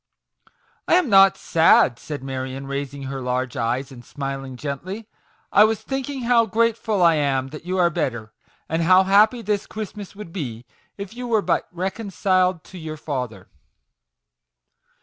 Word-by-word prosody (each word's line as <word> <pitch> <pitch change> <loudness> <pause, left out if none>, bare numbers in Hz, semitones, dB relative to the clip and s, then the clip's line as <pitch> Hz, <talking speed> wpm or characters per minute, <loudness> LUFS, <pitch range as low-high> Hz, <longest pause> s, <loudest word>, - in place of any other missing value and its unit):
"I - - +5
am 360 -7 +2
not 195 -1 +7
sad," 160 -7 +4
said 145 -3 -7
Marion, 130 0 -5
raising 140 0 -5
her 135 0 -5
large 125 0 -2
eyes, 125 +4 -2
and 120 -2 -11
smiling 135 -2 -6
gently. 170 - -6 0.2
" - - -36
I 205 - +7
was 220 0 +1
think 270 0 -3
ing 270 -3 -5
how 235 -1 +4
grateful 220 -2 +1
I 170 -1 +6
am 135 -3 0
that 155 +3 -10
you 185 +1 -2
are 175 -2 +3
better, 120 -10 -3 0.3
and 160 +1 -1
how 185 +3 +6
happy 215 +5 +4
this 205 -2 -1
Christmas 210 -2 -7
would 200 -5 -10
be 125 - -5 0.3
if 200 0 -7
you 245 +1 -6
were 220 -3 +2
but - - 0
reconciled 185 -1 0
to 185 - -11
your 155 -1 -6
father." 125 -10 -5
170 Hz, 165 wpm, -22 LUFS, 135-205 Hz, 0.3 s, not